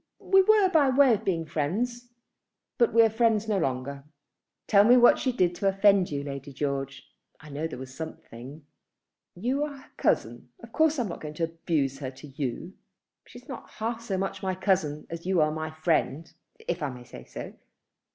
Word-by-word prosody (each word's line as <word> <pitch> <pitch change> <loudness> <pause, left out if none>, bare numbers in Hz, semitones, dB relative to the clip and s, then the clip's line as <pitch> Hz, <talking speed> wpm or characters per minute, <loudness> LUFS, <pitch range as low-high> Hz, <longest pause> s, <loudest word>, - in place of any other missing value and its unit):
We 385 0 +4
were 420 0 +5
by 310 -6 +4
way 260 -1 +5
of 215 0 -2
being 170 -5 -1
friends; 220 +12 -2 0.7
but 235 - +4
we 230 +1 +6
are 225 - +4
friends 225 -1 +2
no 210 -3 +1
longer." 135 -1 -3 0.6
"Tell 200 -1 +5
me 245 +4 +6
what 240 -1 +6
she 260 - 0
did 180 -7 +1
to 195 +3 -1
offend 195 -1 +4
you, 140 -1 -3
Lady 140 0 -7
George? 135 -1 -4 0.3
I 150 0 -13
know 150 +3 -3
there 160 - -8
was 130 0 -9
something." 140 -2 -9 0.7
"You 250 +10 -1
are 290 -2 -5
her 265 - -18
cousin. - - 0
Of - - -11
course 315 -1 +3
I 245 - +1
am 210 - -5
not 170 - -7
going 150 -1 -7
to 165 - -3
abuse 160 -5 -1
her 135 -3 -4
to 135 +3 -13
you." 140 +6 -5 0.5
"She's - - -14
not - - -8
half 230 +1 -4
so 210 -5 -3
much 195 +1 -3
my 190 -1 -1
cousin 185 -6 0
as 170 +1 -6
you 190 -2 +2
are 155 0 +3
my 155 0 -4
friend, 155 0 -1 0.3
if 170 0 -2
I 145 - -1
may 125 -1 -9
say 120 - -12
so. - - -8
175 Hz, 200 wpm, -27 LUFS, 145-225 Hz, 0.7 s, we